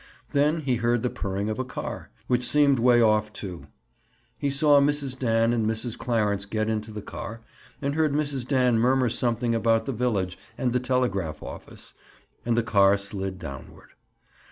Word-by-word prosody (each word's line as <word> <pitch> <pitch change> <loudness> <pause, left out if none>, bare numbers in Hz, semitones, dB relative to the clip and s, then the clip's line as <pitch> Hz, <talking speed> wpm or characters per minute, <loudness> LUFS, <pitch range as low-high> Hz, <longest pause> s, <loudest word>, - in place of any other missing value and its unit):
Then 150 +3 +2
he 130 -4 0
heard 120 0 +1
the 125 - 0
purring 100 +1 -3
of 110 +3 -3
a - - 0
car, 130 - -6 0.2
which 125 -1 +1
seemed 145 -3 +4
way 120 0 +5
off, 110 -1 +2
too. 95 -5 -8 0.7
He 140 - 0
saw 145 +1 +5
Mrs. 140 -2 0
Dan 115 -1 +2
and 115 -2 0
Mrs. 110 +1 -3
Clarence 105 -5 0
get 110 +1 -1
into 110 0 -3
the 105 -1 -7
car 115 +2 -7 0.4
and 140 +1 0
heard 155 -1 +1
Mrs. 140 -4 -1
Dan 125 -4 +3
murmur 125 +1 +3
something 120 0 0
about 115 -1 +2
the 135 - -2
village 105 -7 -1 0.2
and 125 -2 0
the 125 - +2
telegraph 120 -11 -1
office, - - -10 0.5
and 120 -1 +2
the 120 - +3
car 100 -2 +4
slid 95 -1 -3
downward. 70 -7 -10
115 Hz, 175 wpm, -26 LUFS, 105-130 Hz, 0.7 s, way